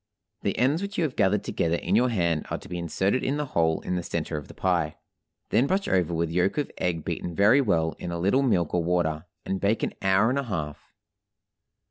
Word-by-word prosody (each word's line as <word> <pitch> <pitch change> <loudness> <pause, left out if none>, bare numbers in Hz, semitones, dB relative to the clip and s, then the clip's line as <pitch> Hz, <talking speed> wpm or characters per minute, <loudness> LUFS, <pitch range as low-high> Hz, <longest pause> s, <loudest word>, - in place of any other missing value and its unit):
The - - -1
ends 140 +7 +2
which 200 0 -5
you - - +2
have 150 -5 -2
gathered 100 +2 +2
together 85 0 0
in 90 +4 0
your 125 +3 +4
hand 85 -8 0
are - - -2
to - - -12
be 90 - -4
inserted 95 +7 0
in 140 +2 0
the 150 - -1
hole 80 - +1
in - - -3
the 90 - -1
center 85 -1 -3
of 75 -2 -5
the - - -13
pie. - - 0 0.6
Then 130 - +3
brush 195 +4 0
over 90 -3 +1
with 85 -1 -1
yolk 90 - +1
of 145 - -1
egg 85 -3 -1
beaten 85 - -4
very 110 - +5
well 80 -9 +1
in 85 - -5
a 85 - -3
little 100 +10 +2
milk 90 - +1
or 90 -1 +2
water, 85 -2 0 0.2
and 95 -1 -2
bake 105 +3 +1
an - - -1
hour 95 +4 +3
and 140 - 0
a - - -1
half. 75 -9 -5
90 Hz, 230 wpm, -26 LUFS, 85-125 Hz, 0.6 s, very